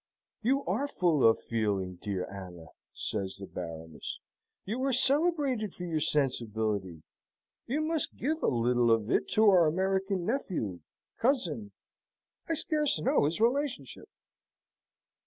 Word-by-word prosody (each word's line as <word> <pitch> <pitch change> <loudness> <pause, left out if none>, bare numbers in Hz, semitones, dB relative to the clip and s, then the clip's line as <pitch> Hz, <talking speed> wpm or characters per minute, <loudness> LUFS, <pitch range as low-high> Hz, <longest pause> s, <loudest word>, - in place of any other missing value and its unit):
"You 270 +5 +1
are 240 +10 0
full 170 - +2
of 115 - 0
feeling, 100 -5 -1
dear 95 -3 -2
Anna," 90 -4 -9 0.2
says 95 -3 -3
the 100 - -8
Baroness. 80 -3 -7 0.5
"You 225 +6 -3
are 275 - +2
celebrated 275 - +1
for 180 - -7
your 165 -3 -1
sensibility. 110 - -1 0.6
You 280 +6 0
must 315 -1 -1
give 315 +4 -1
a - - +1
little 120 0 +2
of 115 0 +2
it - - +1
to 220 - +5
our 180 -5 +6
American 190 +2 0
nephew 175 - -2 0.4
cousin 240 -5 0 0.8
I 330 - +2
scarce 300 - +1
know 155 - +3
his 160 +6 -1
relationship." 240 - -1
170 Hz, 130 wpm, -30 LUFS, -, 0.8 s, our